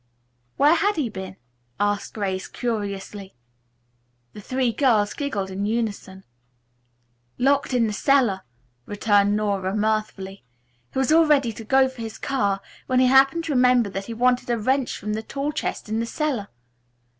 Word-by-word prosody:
"Where 290 Hz, +3 st, +5 dB
had 400 Hz, +5 st, +2 dB
he 285 Hz, -7 st, -1 dB
been?" 190 Hz, -2 st, -7 dB, 0.4 s
asked 205 Hz, 0 st, -1 dB
Grace 190 Hz, -3 st, -2 dB
curiously. 205 Hz, -4 st, -5 dB, 1.0 s
The 210 Hz, -, -10 dB
three 255 Hz, +2 st, 0 dB
girls 225 Hz, -5 st, +2 dB
giggled 205 Hz, -10 st, -3 dB
in 200 Hz, +2 st, -2 dB
unison. 210 Hz, -4 st, -3 dB, 1.1 s
"Locked 275 Hz, +2 st, +2 dB
in 245 Hz, -2 st, +2 dB
the 215 Hz, -, -2 dB
cellar," 245 Hz, -5 st, +2 dB, 0.5 s
returned 205 Hz, -1 st, +2 dB
Nora 200 Hz, -2 st, -1 dB
mirthfully. 210 Hz, -2 st, -2 dB, 0.5 s
"He -, -, -7 dB
was 265 Hz, +2 st, +1 dB
all 325 Hz, 0 st, +5 dB
ready 275 Hz, -6 st, +3 dB
to 225 Hz, -, -9 dB
go 265 Hz, +4 st, +4 dB
for 260 Hz, -2 st, -9 dB
his 220 Hz, -1 st, -6 dB
car 200 Hz, -8 st, -1 dB, 0.3 s
when 255 Hz, -1 st, +2 dB
he 255 Hz, -, +5 dB
happened 270 Hz, +5 st, +5 dB
to 325 Hz, -, -3 dB
remember 250 Hz, -4 st, +3 dB
that 195 Hz, +1 st, -5 dB
he 230 Hz, -, -6 dB
wanted 250 Hz, +1 st, +1 dB
a 240 Hz, -, +1 dB
wrench 260 Hz, +4 st, 0 dB
from 210 Hz, +1 st, -4 dB
the 215 Hz, -, -2 dB
tool 275 Hz, +6 st, -3 dB
chest -, -, -4 dB
in 220 Hz, +1 st, -1 dB
the 230 Hz, -, -2 dB
cellar. 265 Hz, -8 st, -2 dB
225 Hz, 160 wpm, -23 LUFS, 205-265 Hz, 1.1 s, Where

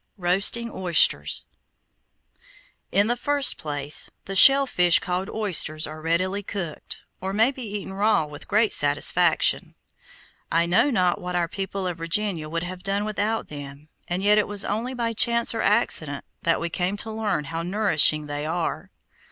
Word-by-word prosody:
ROASTING 195 Hz, +6 st, +1 dB
OYSTERS 165 Hz, -, +1 dB, 1.5 s
In 200 Hz, +2 st, +3 dB
the 240 Hz, +2 st, +1 dB
first 285 Hz, +2 st, +2 dB
place, 145 Hz, -1 st, -2 dB, 0.2 s
the 195 Hz, -, -6 dB
shell 275 Hz, +7 st, +8 dB
fish 180 Hz, -8 st, +3 dB
called 185 Hz, +3 st, -3 dB
oysters 170 Hz, -7 st, 0 dB
are 155 Hz, +1 st, -9 dB
readily 185 Hz, +5 st, -1 dB
cooked, 185 Hz, -6 st, -7 dB, 0.2 s
or 190 Hz, +1 st, -4 dB
may 225 Hz, +5 st, +3 dB
be 265 Hz, -, -10 dB
eaten 205 Hz, -4 st, -6 dB
raw 205 Hz, -3 st, +1 dB
with 150 Hz, 0 st, -12 dB
great 215 Hz, +1 st, +1 dB
satisfaction. 150 Hz, +4 st, +2 dB, 0.8 s
I 165 Hz, +1 st, +2 dB
know 180 Hz, +11 st, +2 dB
not 185 Hz, -8 st, 0 dB
what 180 Hz, 0 st, -5 dB
our 175 Hz, -1 st, 0 dB
people 195 Hz, +1 st, -5 dB
of 175 Hz, -2 st, -4 dB
Virginia 165 Hz, -1 st, -1 dB
would 165 Hz, +1 st, -3 dB
have 180 Hz, +1 st, -7 dB
done 200 Hz, +2 st, -2 dB
without 215 Hz, +1 st, -3 dB
them, 145 Hz, +1 st, -10 dB, 0.2 s
and 180 Hz, +2 st, -3 dB
yet 210 Hz, +1 st, +4 dB
it 210 Hz, -, 0 dB
was 205 Hz, -1 st, +1 dB
only 235 Hz, +5 st, -3 dB
by 230 Hz, -2 st, -2 dB
chance 235 Hz, +1 st, +3 dB
or 225 Hz, -, -3 dB
accident 160 Hz, -, 0 dB, 0.2 s
that 165 Hz, -1 st, +1 dB
we 170 Hz, 0 st, -4 dB
came 185 Hz, +3 st, -2 dB
to 220 Hz, +2 st, -2 dB
learn 215 Hz, -7 st, -2 dB
how 165 Hz, +3 st, -5 dB
nourishing 170 Hz, -5 st, +3 dB
they 145 Hz, 0 st, -5 dB
are. 165 Hz, +2 st, -4 dB
185 Hz, 165 wpm, -23 LUFS, 165-210 Hz, 1.5 s, shell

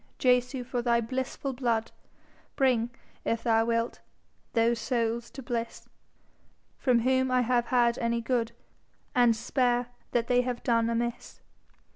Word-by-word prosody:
Jesu, 250 Hz, 0 st, +2 dB
for 245 Hz, 0 st, -2 dB
thy 235 Hz, -1 st, +2 dB
blissful 260 Hz, +3 st, -3 dB
blood, 235 Hz, -3 st, -1 dB, 0.6 s
Bring, 245 Hz, -4 st, +2 dB, 0.3 s
if 230 Hz, 0 st, -1 dB
thou 225 Hz, -1 st, +3 dB
wilt, 230 Hz, 0 st, -1 dB, 0.5 s
those 230 Hz, 0 st, +2 dB
souls 235 Hz, -1 st, -1 dB
to 270 Hz, -, -9 dB
bliss 235 Hz, -1 st, -4 dB, 0.9 s
From 245 Hz, -3 st, +3 dB
whom 260 Hz, +1 st, +2 dB
I 255 Hz, 0 st, +3 dB
have 240 Hz, 0 st, +1 dB
had 240 Hz, -2 st, +2 dB
any 235 Hz, 0 st, 0 dB
good, 235 Hz, -1 st, 0 dB, 0.6 s
And 240 Hz, -2 st, +4 dB
spare 245 Hz, +1 st, 0 dB, 0.2 s
that 235 Hz, -1 st, 0 dB
they 245 Hz, +1 st, +3 dB
have 250 Hz, -1 st, -4 dB
done 230 Hz, -1 st, +2 dB
amiss. 235 Hz, 0 st, -3 dB
240 Hz, 135 wpm, -28 LUFS, 230-250 Hz, 0.9 s, And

